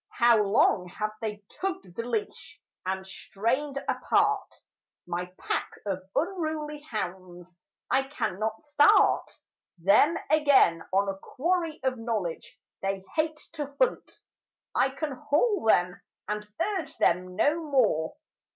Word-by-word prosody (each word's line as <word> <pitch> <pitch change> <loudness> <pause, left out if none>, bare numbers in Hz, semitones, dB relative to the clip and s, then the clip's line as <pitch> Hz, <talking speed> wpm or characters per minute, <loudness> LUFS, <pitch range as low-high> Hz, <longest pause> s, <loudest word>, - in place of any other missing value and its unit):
How 235 -2 +6
long 195 -3 +3
have 215 +4 -3
they 210 -2 -4
tugged 260 - -5
the - - -2
leash, 245 +8 -4 0.3
and 190 0 -2
strained 240 +9 -2
apart - - +1 0.5
My 175 +1 -3
pack - - -2 0.2
of 190 -1 -4
unruly 310 -4 -2
hounds: 180 - -6 0.3
I 265 +1 +1
cannot 220 -4 -3
start 295 0 +4 0.5
Them 200 - +4
again 285 - +5
on 195 +1 +2
a 195 0 -3
quarry 330 - -1
of 260 -2 0
knowledge 215 -8 -3 0.2
they 195 0 -2
hate 310 0 +1 0.2
to 290 -3 -5
hunt, - - +1 0.6
I 265 - +3
can 285 +3 -4
haul 310 - +1
them 180 -4 +3 0.3
and 210 +1 -3 0.3
urge 310 -4 -8
them 180 +1 +1
no 300 - +2
more. 230 - +1
230 Hz, 125 wpm, -28 LUFS, 190-300 Hz, 0.6 s, How